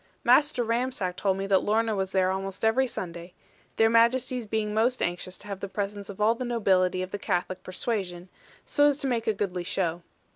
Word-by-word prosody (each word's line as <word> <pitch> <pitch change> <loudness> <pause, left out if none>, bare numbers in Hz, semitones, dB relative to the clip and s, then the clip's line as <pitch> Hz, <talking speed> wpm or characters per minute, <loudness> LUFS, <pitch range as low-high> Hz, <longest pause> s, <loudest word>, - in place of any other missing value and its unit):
Master 290 -4 +4
Ramsack 230 -5 -1
told 195 0 0
me 195 - -2
that 195 -1 +3
Lorna 220 +1 +1
was 190 -1 -2
there 185 -1 +2
almost 195 +2 -3
every 255 +4 +3
Sunday; 175 -5 -7 0.4
their 225 - +4
Majesties 235 +1 +2
being 210 0 -1
most 235 +4 +2
anxious 180 +1 -3
to - - -13
have 200 -2 -5
the 200 - -4
presence 200 0 -4
of 200 - -8
all 215 +2 +4
the 235 - -5
nobility 190 -6 +1
of 185 - -7
the 205 - -4
Catholic 185 -1 -2
persuasion, 185 -2 -3 0.4
so 290 -1 +4
as 285 -1 +2
to - - -2
make 235 -3 -1
a 220 - +3
goodly 185 -3 -3
show. 175 -1 -2
205 Hz, 205 wpm, -27 LUFS, 185-230 Hz, 0.4 s, Master